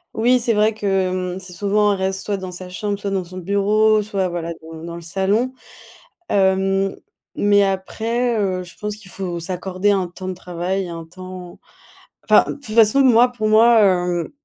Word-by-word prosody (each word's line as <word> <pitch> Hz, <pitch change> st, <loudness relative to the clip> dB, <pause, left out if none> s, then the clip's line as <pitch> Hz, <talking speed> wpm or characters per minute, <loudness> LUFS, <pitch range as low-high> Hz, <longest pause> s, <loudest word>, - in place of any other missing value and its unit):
Oui, 245 Hz, +3 st, +3 dB
c'est 230 Hz, -1 st, +1 dB
vrai 215 Hz, +1 st, +2 dB
que, 215 Hz, -, -7 dB
hem, 185 Hz, -1 st, -1 dB
c'est 180 Hz, -1 st, -9 dB
souvent 205 Hz, +2 st, +2 dB
on -, -, +1 dB
reste, 190 Hz, 0 st, -1 dB
ouais, -, -, -6 dB
soit -, -, -4 dB
dans 185 Hz, -1 st, -7 dB
sa 180 Hz, 0 st, -8 dB
chambre 200 Hz, +2 st, -3 dB
soit 200 Hz, -, -3 dB
dans 195 Hz, -1 st, -1 dB
son 185 Hz, +1 st, -9 dB
bureau 210 Hz, +3 st, +2 dB
soit, 195 Hz, -3 st, -1 dB
voilà, 170 Hz, -1 st, -4 dB
dans 160 Hz, 0 st, -10 dB
dans 170 Hz, 0 st, -6 dB
le 170 Hz, -, -8 dB
salon. 200 Hz, +9 st, 0 dB, 0.8 s
Hem, 195 Hz, 0 st, +1 dB, 0.4 s
mais 205 Hz, 0 st, +4 dB
après, 225 Hz, +5 st, -1 dB
heu, 185 Hz, -2 st, -1 dB
je 175 Hz, -, -14 dB
pense 210 Hz, 0 st, -5 dB
qu'il 200 Hz, -4 st, -12 dB
faut 180 Hz, -3 st, -4 dB
s'accorder 185 Hz, +3 st, -1 dB
un 190 Hz, -3 st, 0 dB
temps 185 Hz, +2 st, -9 dB
de 185 Hz, -, -3 dB
travail, 180 Hz, +2 st, -3 dB
et -, -, -8 dB
un 165 Hz, -1 st, -7 dB
temps 185 Hz, +1 st, -10 dB, 0.6 s
enfin, -, -, +5 dB
de -, -, -3 dB
toute 230 Hz, -7 st, -6 dB
façon 225 Hz, +3 st, +5 dB
moi 245 Hz, -1 st, +5 dB
pour 215 Hz, -3 st, -3 dB
moi, 225 Hz, +1 st, +6 dB
hem, 180 Hz, -3 st, +1 dB
195 Hz, 200 wpm, -20 LUFS, 180-210 Hz, 0.8 s, moi